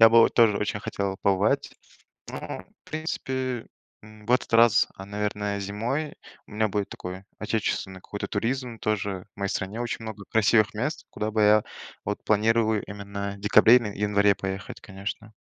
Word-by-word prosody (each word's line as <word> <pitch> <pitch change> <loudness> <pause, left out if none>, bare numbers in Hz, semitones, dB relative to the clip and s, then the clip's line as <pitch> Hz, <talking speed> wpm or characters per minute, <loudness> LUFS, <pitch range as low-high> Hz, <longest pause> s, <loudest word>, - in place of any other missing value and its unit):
Я 115 - +10
бы 115 +1 +7
вот - - +4
тоже 115 -4 +5
очень 105 0 -2
хотел 100 -2 -3
побывать, 100 +1 +2 0.6
но - - -5 0.5
в - - -17
принципе, 130 -6 -3 0.4
м, 105 0 -15
в 120 - -1
этот 125 - +2
раз, 115 -1 +6
а, 95 - -8
наверное, 105 0 -2
зимой 115 +10 -2 0.3
у - - -17
меня 110 +1 +1
будет 100 0 -2
такое, 90 +1 -7
отечественный 100 -3 -2
какой-то 100 - -5
туризм 120 +2 -2
тоже. 100 -3 -2
В - - -47
моей 100 0 -1
стране 100 +5 -3
очень 120 -1 -3
много 110 -2 -7
красивых 110 0 +4
мест, 145 +9 -3
куда 105 +1 -2
бы 110 0 +1
я, 105 0 +6 0.4
вот - - -3
планировую 110 0 +2
именно 100 0 -5
в - - -15
декабре 105 +3 +7
или 120 -4 -2
январе 100 0 +3
поехать, 95 0 -5
конечно. 105 +2 -7
105 Hz, 170 wpm, -26 LUFS, 100-115 Hz, 0.6 s, Я